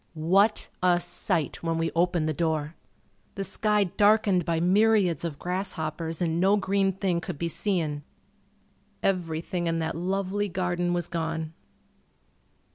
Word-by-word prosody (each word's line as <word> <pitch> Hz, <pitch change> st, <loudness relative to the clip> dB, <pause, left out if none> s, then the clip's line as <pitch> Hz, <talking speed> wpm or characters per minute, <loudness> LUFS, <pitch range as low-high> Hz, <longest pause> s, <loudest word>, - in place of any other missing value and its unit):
What 195 Hz, +7 st, +2 dB
a 180 Hz, -1 st, +4 dB
sight 175 Hz, -2 st, -2 dB
when 165 Hz, -1 st, -1 dB
we 165 Hz, 0 st, 0 dB
opened 170 Hz, -2 st, +2 dB
the 155 Hz, -, 0 dB
door! 155 Hz, -1 st, -1 dB, 0.6 s
The 195 Hz, -, -3 dB
sky 210 Hz, +1 st, +1 dB
darkened 205 Hz, -1 st, +3 dB
by 165 Hz, -1 st, 0 dB
myriads 190 Hz, -2 st, +3 dB
of 160 Hz, -4 st, -4 dB
grasshoppers 170 Hz, -2 st, -3 dB
and 165 Hz, 0 st, 0 dB
no 195 Hz, +3 st, +4 dB
green 195 Hz, 0 st, +1 dB
thing 185 Hz, -2 st, -1 dB
could -, -, -6 dB
be 170 Hz, -, -2 dB
seen. 165 Hz, -4 st, -1 dB, 1.0 s
Everything 175 Hz, -1 st, -1 dB
in 165 Hz, 0 st, 0 dB
that 160 Hz, 0 st, -2 dB
lovely 195 Hz, +3 st, -1 dB
garden 175 Hz, -1 st, -1 dB
was 175 Hz, -1 st, -1 dB
gone. 160 Hz, -2 st, -3 dB
175 Hz, 135 wpm, -27 LUFS, 165-195 Hz, 1.0 s, a